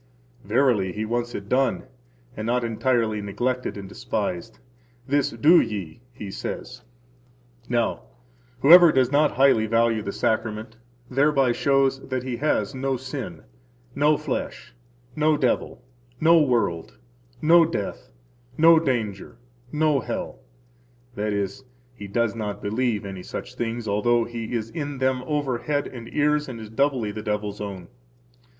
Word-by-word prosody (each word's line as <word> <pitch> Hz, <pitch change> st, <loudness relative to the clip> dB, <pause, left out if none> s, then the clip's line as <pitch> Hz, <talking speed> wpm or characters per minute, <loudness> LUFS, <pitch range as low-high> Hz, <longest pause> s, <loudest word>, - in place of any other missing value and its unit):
Verily, 105 Hz, -3 st, +2 dB
He 110 Hz, +3 st, -3 dB
wants 120 Hz, +2 st, -2 dB
it 100 Hz, -, -6 dB
done, 130 Hz, +4 st, +1 dB, 0.5 s
and 110 Hz, +1 st, -4 dB
not 125 Hz, +1 st, +1 dB
entirely 115 Hz, -2 st, 0 dB
neglected 125 Hz, +5 st, -2 dB
and 100 Hz, -1 st, -7 dB
despised. 105 Hz, 0 st, -4 dB, 0.5 s
This 140 Hz, 0 st, +2 dB
do 155 Hz, +10 st, +5 dB
ye, 100 Hz, -3 st, -5 dB
He 105 Hz, -6 st, -8 dB
says. 125 Hz, +5 st, -6 dB, 0.9 s
Now, 120 Hz, -1 st, 0 dB, 0.6 s
whoever 170 Hz, +3 st, +9 dB
does 130 Hz, -2 st, +2 dB
not 145 Hz, +1 st, +3 dB
highly 130 Hz, -5 st, +4 dB
value 115 Hz, 0 st, +2 dB
the 100 Hz, -, -4 dB
Sacrament 110 Hz, +1 st, -2 dB, 0.3 s
thereby 135 Hz, 0 st, +2 dB
shows 135 Hz, +1 st, +2 dB
that 130 Hz, -2 st, -2 dB
he 125 Hz, -2 st, -4 dB
has 150 Hz, +1 st, 0 dB
no 135 Hz, 0 st, -1 dB
sin, 130 Hz, -, -7 dB, 0.5 s
no 150 Hz, +1 st, +3 dB
flesh, 140 Hz, -3 st, -5 dB, 0.4 s
no 155 Hz, 0 st, +2 dB
devil, 125 Hz, -1 st, -1 dB, 0.4 s
no 165 Hz, +1 st, +6 dB
world, 115 Hz, -, 0 dB, 0.4 s
no 165 Hz, +3 st, +6 dB
death, 130 Hz, -12 st, -4 dB, 0.5 s
no 165 Hz, +1 st, +7 dB
danger, 115 Hz, -7 st, -3 dB, 0.3 s
no 150 Hz, -2 st, +2 dB
hell; 115 Hz, -, -5 dB, 0.7 s
that 105 Hz, -2 st, -2 dB
is, 100 Hz, +6 st, -3 dB, 0.3 s
he 100 Hz, -4 st, -9 dB
does 115 Hz, +2 st, 0 dB
not 105 Hz, -3 st, -4 dB
believe 110 Hz, 0 st, -1 dB
any 95 Hz, -2 st, -6 dB
such 125 Hz, -, -7 dB
things, 120 Hz, -2 st, -4 dB
although 115 Hz, +4 st, +2 dB
he 115 Hz, 0 st, -6 dB
is 115 Hz, -1 st, -3 dB
in 145 Hz, -4 st, -4 dB
them 130 Hz, 0 st, 0 dB
over 145 Hz, -5 st, -1 dB
head 145 Hz, +3 st, -1 dB
and 115 Hz, -2 st, -9 dB
ears 150 Hz, 0 st, +1 dB
and 120 Hz, -3 st, -7 dB
is 110 Hz, -1 st, -9 dB
doubly 130 Hz, -3 st, 0 dB
the 110 Hz, -, -6 dB
devil's 105 Hz, -1 st, -3 dB
own. 95 Hz, -4 st, -6 dB
120 Hz, 140 wpm, -24 LUFS, 105-135 Hz, 0.9 s, whoever